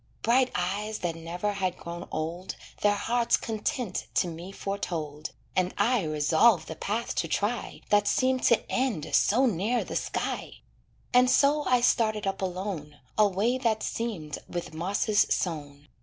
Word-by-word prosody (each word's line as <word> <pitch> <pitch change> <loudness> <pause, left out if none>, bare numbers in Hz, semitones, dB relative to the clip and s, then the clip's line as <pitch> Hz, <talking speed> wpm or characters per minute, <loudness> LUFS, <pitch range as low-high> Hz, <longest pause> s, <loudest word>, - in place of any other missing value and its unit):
Bright 250 +3 +4
eyes 205 +4 -1
that 165 -1 -1
never 170 +5 -3
had 185 -3 -1
grown 170 +1 -7
old 170 +4 -4 0.3
Their 205 0 +4
heart's 235 +3 +2
content 220 -1 -3
to - - +3
me 170 +3 -7
foretold, 165 -7 -4 0.3
And 185 0 +1
I 225 +1 +2
resolved 160 +5 +3
the 160 - -6
path 215 +8 -2
to 165 - +1
try 205 +7 -2
That 205 0 +4
seemed 255 0 +2
to 235 - +3
end 235 - -1
so 250 +6 +4
near 225 +2 +1
the - - -7
sky; - - -3 0.5
And 250 0 +6
so 290 +2 +4
I 250 -1 +3
started 215 -3 +2
up 195 0 -2
alone, 180 -6 -4 0.2
A 215 -1 +5
way 215 +7 0
that 225 -4 +1
seemed 195 -11 -3
with 175 -1 -5
mosses 200 +5 +1
sown. 145 -4 -2
200 Hz, 155 wpm, -28 LUFS, 170-230 Hz, 0.5 s, And